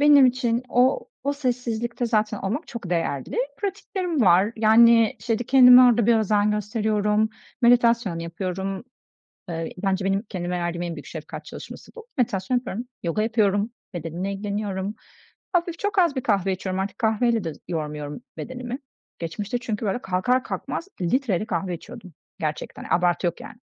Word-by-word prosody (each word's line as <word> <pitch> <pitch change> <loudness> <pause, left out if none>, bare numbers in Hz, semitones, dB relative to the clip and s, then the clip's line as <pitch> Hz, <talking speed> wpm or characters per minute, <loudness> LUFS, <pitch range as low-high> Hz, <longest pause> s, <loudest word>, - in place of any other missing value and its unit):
Benim 290 -2 +7
için 245 -1 +1
o 250 +2 +2 0.2
o 285 - +1
sessizlikte 245 -3 -2
zaten 215 -2 +1
olmak 225 - -3
çok 230 -7 -7
değerli. 155 -6 -1 0.2
Pratiklerim 375 -5 -2
var, 190 +1 +5
yani, 225 0 +6
işte, 230 -2 -1
kendime 250 +1 +8
orada 240 -3 +5
bir 235 -1 +5
özen 210 -1 +2
gösteriyorum, 210 0 +1 0.3
meditasyon 235 -6 +4
yapıyorum, 190 +4 -4 0.6
eee, 165 -1 -4
bence 195 0 0
benim 195 +1 +1
kendime 180 -4 -4
verdiğim 175 0 -2
en 170 -1 -3
büyük 145 - -9
şefkat 160 -1 -8
çalışması - - -10
bu. 460 -1 -10
Meditasyon 230 -1 +1
yapıyorum, 245 -1 -4
yoga 170 +5 0
yapıyorum, 215 -1 +1 0.2
bedenimle 175 +3 -4
ilgileniyorum. 200 0 -3 0.6
Hafif, 345 -1 0
çok 410 -1 0
az 340 -5 +3
bir 260 - -1
kahve 195 -3 +1
içiyorum, 185 0 -3
artık 195 +5 -4
kahveyle 225 -1 +2
de 165 -2 -4
yormuyorum 150 -1 -4 0.2
bedenimi. 250 +1 -5 0.4
Geçmişte 200 +7 -3
çünkü 230 -3 -4
böyle 205 +5 -1
kalkar 195 +8 +1
kalkmaz 335 - -4
litreyle 210 +1 +1
kahve 180 -2 -2
içiyordum 200 0 -12 0.3
gerçekten, 155 -1 -4
abartı 175 -1 +2
yok 170 - -4
yani. - - -10
215 Hz, 150 wpm, -24 LUFS, 185-245 Hz, 0.6 s, kendime